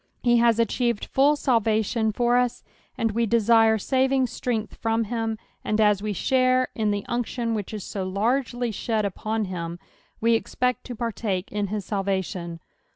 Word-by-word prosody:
He 240 -1 +4
has 235 -1 +4
achieved 235 0 0
full 285 +3 +3
salvation 225 -4 +1
(or 240 0 +3
ua, 250 0 +4 0.5
and 225 -1 +1
we 230 +2 0
desire 225 0 +4
Easing 265 +4 +2
strength 230 -3 -3
from 225 0 0
him, 225 0 -2 0.3
and 215 - 0
as 210 -2 +4
we 210 0 -2
share 255 +4 +2
in 215 -2 0
the 205 -1 -1
unction 240 -1 -2
which 210 -3 -3
is 210 -3 -5
so 195 +1 -4
largely 240 +5 0
shed 215 0 -1
upon 215 +3 -2
hinl, 170 -2 -5 0.4
we 230 +1 +3
expect 250 +2 -1
to 245 - -6
partake 215 -5 -3
in 205 0 -1
his 205 -1 -4
salvation. 190 -4 -2
225 Hz, 160 wpm, -25 LUFS, 205-240 Hz, 0.5 s, He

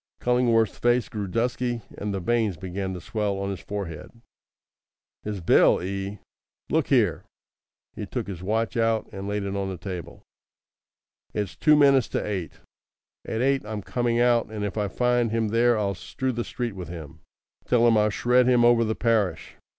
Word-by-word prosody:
Cullingworth's 120 -3 +2
face 120 0 +2
grew 105 -2 -4
dusky, 120 +2 -1
and 105 0 -4
the 100 - -2
veins 110 -1 0
began 95 +2 -4
to - - -6
swell 105 +2 -2
on 100 0 -2
his 95 - -5
forehead. 95 -6 -6 1.1
"His 105 -3 -5
bill, 85 - +5
eh! 100 +2 -4 0.5
Look - - +2
here!" - - +2 0.7
He - - -5
took - - -3
his 95 -3 -7
watch 110 +5 -1
out 115 -1 +1
and 95 0 -6
laid 105 0 -2
it 100 0 -3
on 100 -1 -2
the 95 - -5
table. 90 -1 -7 1.1
"It's 105 -4 -2
two 155 -1 +4
minutes 140 -4 +5
to - - -2
eight. 95 -5 -4 0.7
At 110 - -2
eight 135 0 +2
I'm 105 -1 -5
coming 120 +1 0
out, 120 -1 +3
and 105 -1 -4
if 100 - -4
I 105 -2 0
find 120 +2 +1
him 110 -1 0
there 115 +1 +3
I'll 100 -2 0
strew 130 +7 -3
the 120 -1 -3
street 120 -2 -4
with 90 -3 -7
him. 80 -2 -9 0.5
Tell 120 -1 +4
him 115 - +5
I'll 105 0 +3
shred 125 +4 +3
him 120 -2 +5
over 120 -1 +5
the 110 -1 -1
parish. 110 -5 0
110 Hz, 180 wpm, -25 LUFS, 100-120 Hz, 1.1 s, bill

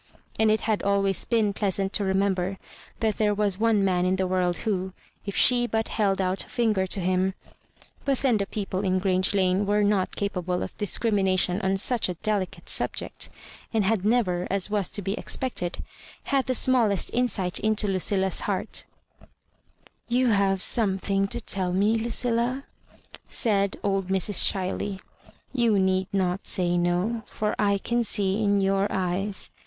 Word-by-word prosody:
And 220 0 +4
it 215 0 +2
had 215 -2 0
always 195 -1 +1
been 220 -4 +1
pleasant 195 -1 -1
to 205 - +1
remember 190 -1 0 0.4
that 220 -2 0
there 210 -1 +2
was 200 -2 -1
one 220 -3 +2
man 180 -2 +1
in 185 +1 +2
the 190 0 0
world 180 -1 0
who, 190 -3 -1 0.3
if 200 - -4
she 245 -1 +4
but 225 -1 -1
held 195 -3 0
out 185 0 -1
a - - -18
finger 215 -5 0
to 195 - -1
him 185 +1 0 0.7
But 275 -2 +1
then 250 -4 +2
the 200 -1 -2
people 195 -2 -3
in 185 -1 +1
Grange 185 +1 +1
Lane 190 +1 +1
were 210 +1 +2
not 200 -2 +1
capable 180 -3 -2
of - - -7
discrimination 195 -3 +1
on 190 0 0
such 230 +1 +1
a 180 - -3
delicate 190 -2 -2
subject, - - 0 0.4
and 220 -2 +1
had 200 -1 +1
never, 200 -6 +1
as 195 +1 +1
was 205 -3 0
to 205 - -2
be 195 +2 -1
expected, 215 -6 -2 0.4
had 275 -1 0
the 255 - 0
smallest 230 -7 +2
insight 205 -7 0
into 215 0 0
LudUa's 190 0 +1
heart - - -3 0.6
" - - -33
You 255 -1 +3
have 195 -2 +2
something 195 -2 +2
to - - -3
tell 185 -2 0
me, 205 +4 +2
Ludlla? 240 +3 0 0.3
" - - -19
fiaid 200 -4 +2
old 195 -2 0
Mrs. 190 +1 +3
Ohiley. 190 +1 -3 0.3
" - - -26
You 235 -5 +2
need 190 -1 +1
not 190 -1 -1
say 175 -2 +1
no, 175 +6 0
for 210 0 -2
I 200 -1 +2
can 235 +4 -1
see 200 -2 +1
in 200 -1 +2
your 195 +1 +1
eyes. 190 +2 -1
195 Hz, 170 wpm, -25 LUFS, 190-215 Hz, 0.7 s, And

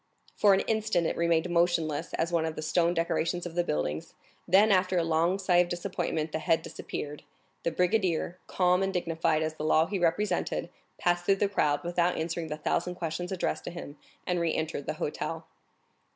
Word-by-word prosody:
For 200 -2 +5
an 190 - +1
instant 215 -6 0
it - - 0
remained 170 0 +2
motionless 170 -3 +1
as 165 +1 -1
one 170 -2 +2
of 160 - -4
the 155 - -5
stone 170 +2 +2
decorations 170 +1 0
of 175 - -6
the 175 +1 +1
building, 75 - -1 0.4
then 200 +4 +5
after 185 -1 +3
a 170 - +3
long 165 +3 +2
sigh 185 -2 +2
of 175 0 +4
disappointment 175 -3 -2
the 160 - -2
head 160 +1 +1
disappeared. 145 0 -6 0.4
The - - 0
brigadier, 180 0 0
calm 180 0 +2
and 195 0 0
dignified 165 -3 0
as 155 0 -2
the 155 - -7
law 155 +1 +4
he 195 +2 -3
represented, 175 +5 0 0.3
passed 175 0 +1
through 195 - +5
the 200 +1 +1
crowd, 150 -7 +1
without 175 0 +1
answering 165 +1 -2
the 150 0 -4
thousand 175 +3 -1
questions 175 +1 -4
addressed 185 - -2
to - - -3
him, 170 -4 -8 0.3
and 180 -1 0
re 170 -1 +1
entered 155 -3 -3
the - - -1
hotel. - - -4
170 Hz, 195 wpm, -29 LUFS, 160-180 Hz, 0.4 s, For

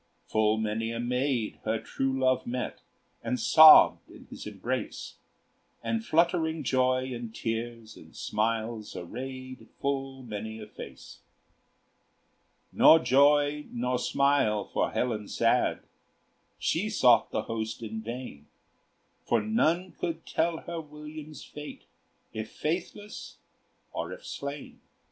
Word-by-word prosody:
Full 110 0 +2
many 110 +1 -1
a 115 - -4
maid 125 -1 -1
her 110 +1 0
true 135 +4 -2
love 130 -1 +2
met, 125 +1 -4 0.4
And 125 - -2
sobbed 155 +7 +8
in - - -14
his - - -8
embrace, - - -4 0.7
And 225 -1 -1
fluttering 165 -4 +1
joy 130 0 +1
in 120 -2 -6
tears 115 0 -4
and - - -15
smiles 110 0 -2
Arrayed 130 +6 -7
full 135 -1 -2
many 110 -1 -6
a 105 - -7
face. 105 - -11 1.5
Nor 160 - +8
joy 145 0 +3
nor 125 +1 -1
smile 140 -7 +2
for - - -1
Helen 110 -4 -2
sad; - - +1 0.8
She 190 +7 0
sought 125 - +4
the 110 - -2
host 110 0 -4
in 110 0 -5
vain; 115 - -7 0.8
For - - +2
none 185 -5 +1
could 165 -2 -4
tell 165 0 0
her 170 -1 -5
William's 150 0 -10
fate, 150 0 -9 0.5
If 110 0 -5
faithless 205 +10 -4 0.6
or - - -4
if - - -9
slain. 140 0 -7
130 Hz, 120 wpm, -28 LUFS, 115-150 Hz, 1.5 s, sobbed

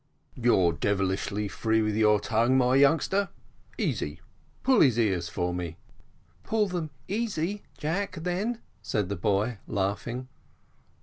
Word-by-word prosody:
"You're 95 -8 +3
devilish 95 +3 0 0.2
free 110 -1 +1
with 105 -1 0
your 105 -1 +4
tongue, 115 +5 +2
my 125 0 +3
youngster. 160 +8 +3 0.5
Easy, - - -2 0.4
pull 260 -3 +5
his 125 -5 +5
ears 95 -7 +1
for 90 +1 -1
me." 85 -2 -4 0.7
"Pull 215 -2 +1
them 175 -4 -3 0.2
easy, 205 -2 -2 0.2
Jack, 180 +6 -2
then," 185 +8 -2 0.2
said 105 -4 -1
the 100 - -1
boy, 105 +4 0
laughing. 105 +6 -2
120 Hz, 125 wpm, -28 LUFS, -, 0.7 s, pull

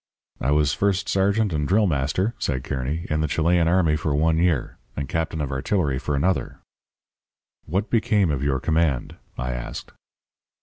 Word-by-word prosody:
"'I 70 - +1
was 75 -1 +2
first 100 +1 0
sergeant 100 +1 +1
and 75 -1 -1
drill 105 +3 +3
master,' 80 - 0
said 65 -3 -2
Kearny, 70 +5 -3
'in 75 0 +1
the 80 - +1
Chilean 85 +3 +2
army 85 -3 +3
for 75 -1 -1
one 80 +2 +2
year. 85 -6 0 0.2
And 70 -1 -2
captain 80 +2 -2
of 70 -1 -3
artillery 70 0 0
for 70 +1 -2
another.' 85 +7 0 1.1
"'What 95 +7 -1
became 105 -6 +2
of 70 -2 -2
your 70 -2 +1
command?' 80 -4 0 0.2
I 60 0 -2
asked. - - -6
80 Hz, 165 wpm, -23 LUFS, 70-95 Hz, 1.1 s, drill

